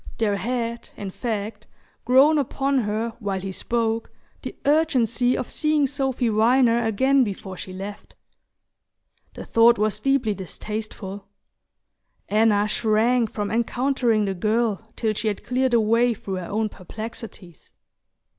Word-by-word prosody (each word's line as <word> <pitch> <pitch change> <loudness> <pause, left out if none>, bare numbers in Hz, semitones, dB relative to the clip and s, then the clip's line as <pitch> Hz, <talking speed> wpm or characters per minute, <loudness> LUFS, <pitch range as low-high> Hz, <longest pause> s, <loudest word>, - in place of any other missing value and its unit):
There 205 -3 +1
had, 235 0 -3
in 200 -2 -5
fact, 215 -1 -4 0.4
grown 280 +5 +5
upon 275 0 0
her 220 +1 -1
while 200 -4 -2
he 190 +1 -5
spoke 225 +2 -1 0.3
the - - -7
urgency 255 -5 +2
of - - -3
seeing 305 -2 +1
Sophy 265 -2 -1
Viner 235 +2 +3
again 260 +5 +3
before 195 -3 -5
she 185 - -8
left. 200 +2 -8 1.2
The - - -8
thought 235 +1 +5
was 210 -1 0
deeply 270 -6 +1
distasteful: 200 0 -6 1.0
Anna 210 -1 +3
shrank 225 +2 +2
from 205 -1 -3
encountering 235 -1 +1
the 195 - -1
girl 215 +2 0
till 220 -2 0
she 220 - -3
had 205 -2 -2
cleared 255 0 +1
a - - +5
way 230 +2 +2
through 195 -2 -5
her 180 -2 -6
own 215 +1 -1
perplexities. 205 - -9
225 Hz, 135 wpm, -23 LUFS, 210-245 Hz, 1.2 s, grown